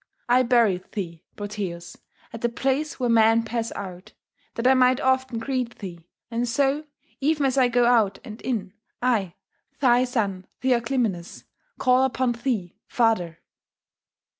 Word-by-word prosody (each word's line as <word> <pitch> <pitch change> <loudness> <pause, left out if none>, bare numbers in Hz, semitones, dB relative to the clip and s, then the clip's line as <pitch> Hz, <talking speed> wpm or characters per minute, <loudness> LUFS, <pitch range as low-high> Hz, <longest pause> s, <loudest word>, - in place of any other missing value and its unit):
I 245 +1 +5
buried 230 -7 +2
thee, 170 -6 -5
Proteus, 195 -5 -5 0.4
at 230 - -7
the 240 - +1
place 270 +5 -1
where 250 - +1
men 225 0 +4
pass 230 0 -3
out, 185 -2 -8 0.4
that 230 - -3
I 260 - +7
might 255 0 +4
often 260 -3 +1
greet 250 0 -3
thee; 175 -4 -9 0.2
and 235 +1 -1
so, 280 +5 +1 0.3
even 295 0 +1
as 265 -1 +1
I 260 -2 +4
go 245 0 +3
out 220 -5 +3
and 220 -4 -9
in, 205 -7 -3 0.3
I, 215 -8 0 0.4
thy 250 -1 +4
son 200 -7 -2 0.2
Theoclymenus, 235 -8 0 0.3
call 255 0 +3
upon 260 -1 +1
thee, 235 -7 -3
father! 215 -9 +1
235 Hz, 140 wpm, -24 LUFS, 205-255 Hz, 0.4 s, I